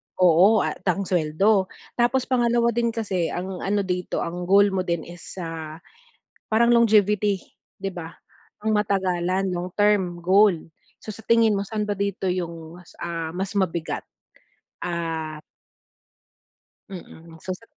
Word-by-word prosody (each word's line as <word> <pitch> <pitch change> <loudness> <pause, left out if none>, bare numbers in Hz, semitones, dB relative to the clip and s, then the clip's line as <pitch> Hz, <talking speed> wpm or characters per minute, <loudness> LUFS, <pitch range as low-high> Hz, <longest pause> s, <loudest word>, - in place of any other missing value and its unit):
oo 185 +4 +5
at - - -3
ang 195 +2 +1
suweldo. 185 +4 +2 0.3
Tapos 245 +2 +3
pangalawa 235 -2 +2
din 235 +1 0
kasi 200 -7 -1
ang 185 +1 -4
ano 200 +1 0
dito, 180 -1 -2
ang 175 +1 -5
goal 200 +1 +5
mo 190 - -1
din 170 -3 -1
is, 175 +1 -11
ah, 160 -1 -6 0.7
parang 235 +2 +3
longevity, 210 -4 +3 0.3
di 195 0 -4
ba? 170 -2 -7 0.5
Pang 220 - 0
matagalan, 190 -2 0
long 175 +1 -3
term 205 -4 +2
goal. 195 +1 +5 0.5
So, 215 - -6
sa 220 - -11
tingin 230 -2 +4
mo, - - -1
saan 215 0 -2
ba 205 - -2
dito 200 -1 -3
yung 170 -2 -5
mas, 175 - -18
ah, 165 -2 -3
mas 195 +2 -3
mabigat? 170 -3 -1 0.8
Ah 160 -3 -3 1.5
Mm, 165 -3 -11
so 185 +1 -4
sat 230 +4 -17
190 Hz, 140 wpm, -24 LUFS, 175-210 Hz, 1.5 s, oo